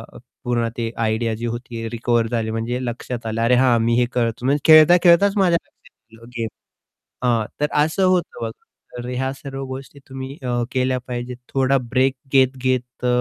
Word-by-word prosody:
अ, - - -9 0.3
पूर्ण 120 -1 0
ते 115 -1 -2
आयडिया 115 0 0
जी 120 +2 -5
होती 120 -1 -5
रिकव्हर 120 0 0
झाली 110 -1 -2
म्हणजे 115 +3 -2
लक्षात 120 0 -5
आलं 110 0 -2
अरे 120 +2 +4
हां, 125 -2 +4
मी 115 +1 +2
हे 125 - +3
करतो 120 0 -1
म्हणजे 140 +2 +2
खेळता-खेळताच 175 +5 +6
माझ्या 175 -3 +4
लक्षात 110 0 -23
आलं 115 +1 -14
गेम. 115 - -1 0.8
हां, 115 -3 +2 0.2
तर 150 - +3 0.2
असं 165 +5 +1
होतं 185 -8 0
बघा. 115 -1 -3 0.5
तर 120 - -6
ह्या 130 +1 -2
सर्व 135 0 -7
गोष्टी 135 +2 -8
तुम्ही 130 0 -6
अ, 120 -1 0
केल्या 130 0 0
पाहिजेत. 125 0 -5
थोडा 135 0 +2
ब्रेक 130 +2 +1 0.2
घेत-घेत 130 -2 +1
अ, - - +3
125 Hz, 175 wpm, -21 LUFS, 115-135 Hz, 0.8 s, खेळता-खेळताच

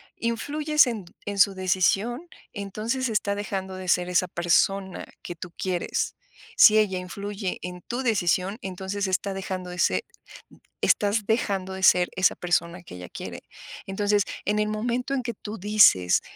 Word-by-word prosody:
influyes 290 +5 +2
en 215 -6 -4 0.2
en 205 -1 -4
su 200 0 +6
decisión, 195 - +1 0.3
entonces, 220 +5 -3
está 205 -2 0
dejando 190 -2 -4
de 185 0 -7
ser 180 +1 +2
esa 180 0 +2
persona 185 +2 +1 0.2
que 175 - -7
tú 175 +1 -9
quieres. 180 -2 -2 0.4
Si 215 -1 +8
ella 200 -4 +2
influye 200 +1 -5
en 180 0 -7
tu 240 +7 -4
decisión, 190 -2 +1
entonces, 190 +1 -3
está 190 +1 -1
dejando 185 -2 -5
ese 180 -1 +1 0.8
estás 205 +1 +2
dejando 195 -4 0
de 190 - -6
ser 180 -1 +5
esa 185 0 +3
persona 175 0 -1
que 165 - -11
ella 90 0 -8
quiere. - - -7 0.5
Entonces, 205 +1 +1 0.2
en 210 +1 +1
el 210 - +1
momento 240 +5 -2
en 260 -3 -1
que 235 - -3
tú 215 0 -8
dices: 195 - +5
195 Hz, 155 wpm, -25 LUFS, 180-215 Hz, 0.8 s, Si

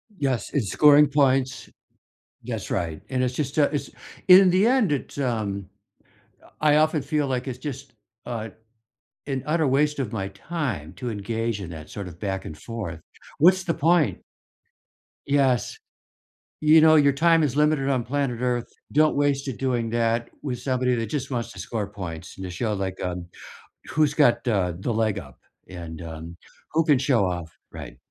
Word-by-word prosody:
Yes, 135 - -2
it's 120 -9 0
scoring 150 0 +6
points 135 -2 +1 0.7
that's - - -5
right, 80 -2 -2
and 130 -1 0
it's 125 0 0
just, 140 +1 -3
uh 145 - +5
it's 145 - -2 0.4
in 185 0 +9
the 190 +5 +4
end, 245 - +3
it's 145 -1 -3
um, 110 -7 -2 1.0
I 150 -1 +4
often 155 0 +3
feel 150 +1 0
like 130 0 -2
it's 125 -1 -5
just, 135 -1 -7 0.3
uh, 115 -2 -4 0.8
an 135 -2 -2
utter 155 0 +1
waste 150 +3 +2
of 130 -6 -3
my 95 -3 -3
time 120 - -4
to 120 +6 -5
engage 115 +1 -3
in 90 -4 -7
that 80 -2 -9
sort 100 -2 -6
of 85 -1 -13
back 95 -2 -3
and 80 - -8
forth. 95 -4 -6 0.4
What's 185 +4 +5
the 165 - 0
point? 165 0 +2 1.1
Yes, 135 -3 +1 0.8
you 155 +1 +6
know, 160 0 +7
your 140 -2 +5
time 165 +3 +4
is 140 -3 0
limited 150 -2 +2
on 130 -4 0
planet 130 -2 -2
Earth, 125 -1 0 0.3
don't 155 +1 +3
waste 140 -1 +1
it 130 - -5
doing 120 -4 -1
that 115 0 0
with 125 -4 -4
somebody 125 -1 0
that 115 -1 -2
just 140 +4 -4
wants 120 -2 -3
to - - -13
score 110 -4 -3
points, 90 -5 -8
and 95 - -7
to 90 - -5
show, 110 +5 -2
like, 95 -1 -4
um, 90 -1 -4 0.6
who's 150 +2 +1
got 140 -6 +3
the 95 -8 0
the 120 - -1
leg 110 -2 0
up 65 -8 -11 0.3
and, 85 -3 -8
um, 80 +1 -8 0.4
who 160 +1 +2
can 150 -4 +4
show 125 -5 +2
off, 85 -3 -5 0.2
right. - - -9
125 Hz, 175 wpm, -24 LUFS, 100-145 Hz, 1.1 s, in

